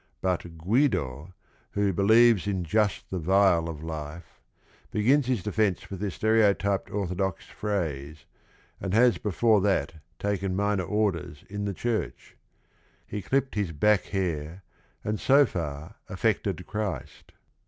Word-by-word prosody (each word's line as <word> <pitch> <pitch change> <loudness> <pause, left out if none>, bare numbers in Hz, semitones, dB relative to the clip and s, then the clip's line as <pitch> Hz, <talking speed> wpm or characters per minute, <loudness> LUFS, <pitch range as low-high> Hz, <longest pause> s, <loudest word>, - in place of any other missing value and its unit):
But 90 -2 -2
Guido, 90 - 0 0.4
who 100 -1 +1
"believes 110 +2 +5
in 95 -3 -1
just 105 +4 0
the 95 - -2
vile 90 -1 +3
of 80 -1 -7
life," 80 -1 -7 0.5
begins 125 +6 +2
his 125 -8 0
de 105 - -3
fence 105 -4 0
with 95 - -5
the 105 0 -1
stereotyped 100 -2 +2
orthodox 95 -1 -2
phrase, 80 -7 -4 0.5
and 95 +1 -2
has 120 +1 +4
before 105 +1 +2
that 95 -7 +1 0.2
taken 100 -2 -1
minor 100 -2 0
orders 100 -8 -1
in 100 0 -3
the 100 - -2
church; 115 +1 -3 0.7
"he 105 - -5
clipped 135 +5 0
his 100 -6 -2
back 105 +6 +3
hair 90 -2 -3 0.4
and 105 0 -2
so 140 +2 +5
far 80 - -5
affected 100 -3 -1
Christ." 105 -10 -5
100 Hz, 130 wpm, -27 LUFS, 85-105 Hz, 0.7 s, believes